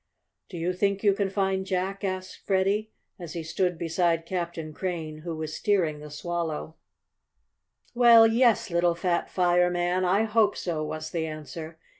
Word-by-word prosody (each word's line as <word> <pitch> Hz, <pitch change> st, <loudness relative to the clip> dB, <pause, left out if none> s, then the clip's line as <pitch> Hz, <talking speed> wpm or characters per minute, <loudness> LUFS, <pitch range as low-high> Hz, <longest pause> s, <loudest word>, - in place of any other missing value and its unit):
"Do 180 Hz, -, -7 dB
you 170 Hz, +2 st, -1 dB
think 200 Hz, +2 st, 0 dB
you 200 Hz, -2 st, +5 dB
can 195 Hz, 0 st, -1 dB
find 190 Hz, -1 st, 0 dB
Jack?" 190 Hz, +1 st, -2 dB
asked 185 Hz, -1 st, -4 dB
Freddie, 195 Hz, +3 st, +1 dB, 0.3 s
as 170 Hz, -3 st, -7 dB
he 170 Hz, -2 st, -4 dB
stood 180 Hz, +2 st, -1 dB
beside 165 Hz, 0 st, 0 dB
Captain 170 Hz, -3 st, -4 dB
Crane, 160 Hz, -3 st, -4 dB
who 165 Hz, +1 st, -5 dB
was 155 Hz, -1 st, -5 dB
steering 180 Hz, -8 st, +1 dB
the 150 Hz, 0 st, -9 dB
Swallow. 160 Hz, +1 st, -4 dB, 1.2 s
"Well, 235 Hz, -2 st, +7 dB
yes, 230 Hz, -3 st, +3 dB
little 170 Hz, 0 st, +2 dB
fat 170 Hz, 0 st, -1 dB
fireman. 180 Hz, 0 st, +2 dB
I 190 Hz, +4 st, +3 dB
hope 220 Hz, -2 st, +2 dB
so," 165 Hz, -4 st, -2 dB
was 155 Hz, 0 st, -5 dB
the 160 Hz, -2 st, -2 dB
answer. 155 Hz, +1 st, -8 dB
180 Hz, 155 wpm, -27 LUFS, 165-195 Hz, 1.2 s, Well